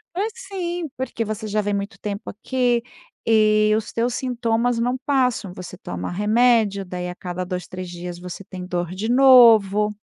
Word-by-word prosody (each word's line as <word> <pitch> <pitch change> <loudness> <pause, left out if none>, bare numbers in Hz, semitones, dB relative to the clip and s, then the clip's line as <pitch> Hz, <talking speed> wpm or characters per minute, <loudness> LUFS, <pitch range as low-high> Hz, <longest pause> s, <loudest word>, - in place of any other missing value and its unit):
"Pois 420 +4 -1
sim, 355 - -4
porque 255 -3 -3
você 215 +1 -4
já 210 0 -1
vem 205 0 -2
muito 200 0 -4
tempo 205 -1 -5
aqui 245 +2 0 0.4
e 215 -1 +4
os 215 -1 -3
teus 235 +1 0
sintomas 240 -1 0
não 245 +2 0
passam. 250 -8 +1
Você 185 0 -8
toma 90 - -5
remédio, 210 0 +2
daí 180 0 -5
a 180 - -7
cada 180 0 -5
2, 180 -1 -5
3 185 -1 -7
dias 175 0 -7
você 180 +2 -8
tem 185 -1 -8
dor 175 -2 -3
de 215 +5 -3
novo". 230 -6 +6
215 Hz, 175 wpm, -22 LUFS, 185-245 Hz, 0.4 s, novo